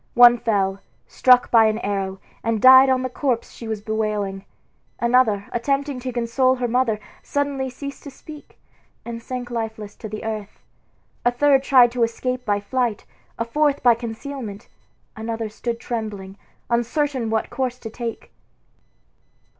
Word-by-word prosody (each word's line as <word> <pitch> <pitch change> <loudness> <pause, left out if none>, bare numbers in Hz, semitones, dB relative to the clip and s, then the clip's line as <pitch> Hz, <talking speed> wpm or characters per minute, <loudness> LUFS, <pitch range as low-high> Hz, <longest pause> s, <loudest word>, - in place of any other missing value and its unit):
One 240 0 +8
fell, 195 -4 0 0.3
struck 250 -1 +4
by 225 -2 +6
an 215 0 +1
arrow, 195 -3 -3 0.2
and 225 -1 0
died 260 +3 +8
on 260 -1 +2
the - - 0
corpse 250 -2 -2
she 230 - -9
was 220 -2 -3
bewailing. 210 -3 -2 0.5
Another, 235 -4 +2
attempting 275 +2 -1
to 255 +1 -4
console 245 +2 +1
her 250 -1 -2
mother, 235 -3 +1 0.2
suddenly 280 -2 -2
ceased 280 +2 -8
to - - -6
speak, 295 +2 -13 0.5
and 230 -1 -6
sank 245 0 -6
lifeless 220 -3 -4
to 215 - -8
the 215 +1 -6
earth. 215 -2 -5 0.7
A 245 - +4
third 270 +2 +3
tried 255 -3 +5
to 245 0 -3
escape 250 +2 -1
by 205 -2 +1
flight, 235 +1 -2 0.3
a 230 - -1
fourth 290 +3 +1
by 240 -1 +7
concealment, 230 -2 -7 0.5
another 225 0 -4
stood 230 +2 -4
trembling, 210 -6 -5 0.3
uncertain 240 +1 0
what 220 0 -1
course 255 -2 -2
to 225 -3 -8
take. 230 0 -6
235 Hz, 150 wpm, -22 LUFS, 220-255 Hz, 0.7 s, One